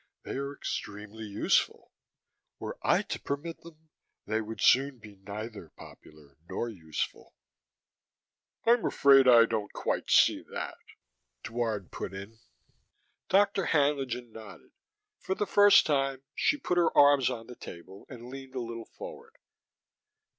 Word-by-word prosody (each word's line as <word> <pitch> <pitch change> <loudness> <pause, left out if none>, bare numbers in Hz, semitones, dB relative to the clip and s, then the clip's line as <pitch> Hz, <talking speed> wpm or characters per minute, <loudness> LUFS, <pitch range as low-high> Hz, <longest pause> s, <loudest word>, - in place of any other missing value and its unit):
They - - -7
are 140 0 -3
extremely 105 -2 -6
useful. 100 -1 0 0.7
Were - - -6
I - - +2
to - - -5
permit 150 +4 -5
them, 160 -1 -16 0.4
they 110 +1 -1
would 110 +1 -7
soon 135 +1 +4
be 105 -2 -14
neither 100 -1 -8
popular 75 -3 -16
nor 120 - -3
useful." 80 -8 -6 1.3
"I'm 235 0 +4
afraid 135 -1 +5
I 120 -2 +8
don't 110 -3 -3
quite - - -2
see - - +5
that," - - -5 0.6
Dward 110 -4 -3
put 95 - -6
in. 100 +3 -10 0.9
Dr. 200 -1 +3
Haenlingen 135 -5 0
nodded. 110 -1 -12 0.5
For 190 - -3
the 210 - -1
first 205 0 +6
time, 135 -3 0
she 295 - +1
put 180 -10 0
her 170 - +1
arms 145 -3 +6
on 115 -3 -5
the 125 - -11
table 95 +1 -11
and 120 -3 -10
leaned 135 0 -10
a - - -1
little 115 -1 -7
forward. 475 -1 -10
125 Hz, 135 wpm, -29 LUFS, 110-145 Hz, 1.3 s, I